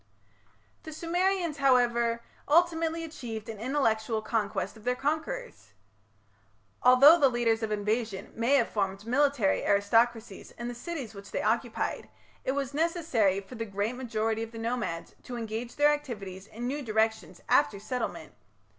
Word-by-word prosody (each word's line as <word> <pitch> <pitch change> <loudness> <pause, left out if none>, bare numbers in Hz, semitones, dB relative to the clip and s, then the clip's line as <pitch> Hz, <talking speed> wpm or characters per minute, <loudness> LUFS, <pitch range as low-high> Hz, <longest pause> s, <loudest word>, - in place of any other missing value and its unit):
The 315 - -9
Sumerians, 350 0 0
however, 235 -3 +3 0.2
ultimately 330 +1 +2
achieved 240 -9 -7
an 220 -2 -6
intellectual 225 -4 0
conquest 215 -1 -2
of 220 - -15
their 250 +2 +1
conquerors. 315 - -3 1.1
Although 275 +7 +8
the 275 - +5
leaders 235 -2 +1
of 220 -1 -2
invasion 210 -1 -2
may 235 +5 +2
have 245 -4 +3
formed 195 -1 -2
military 260 -4 +2
aristocracies 225 +1 +1
in 235 +1 -4
the - - -4
cities 265 -2 -6
which 200 -1 -11
they - - -3
occupied, 230 +2 -1 0.3
it 260 - 0
was 275 -1 -2
necessary 290 - +1
for 200 - -13
the 225 -2 -4
great 205 +2 -2
majority 225 -3 -1
of 225 0 -5
the 230 - -9
nomads 225 -7 -3
to 245 - -7
engage 230 +1 -5
their 295 +1 +5
activities 200 -9 -6
in 235 +3 -7
new 280 +4 -2
directions 220 - -1
after 205 -2 +3
settlement. 250 +5 -4
235 Hz, 145 wpm, -29 LUFS, 220-280 Hz, 1.1 s, Although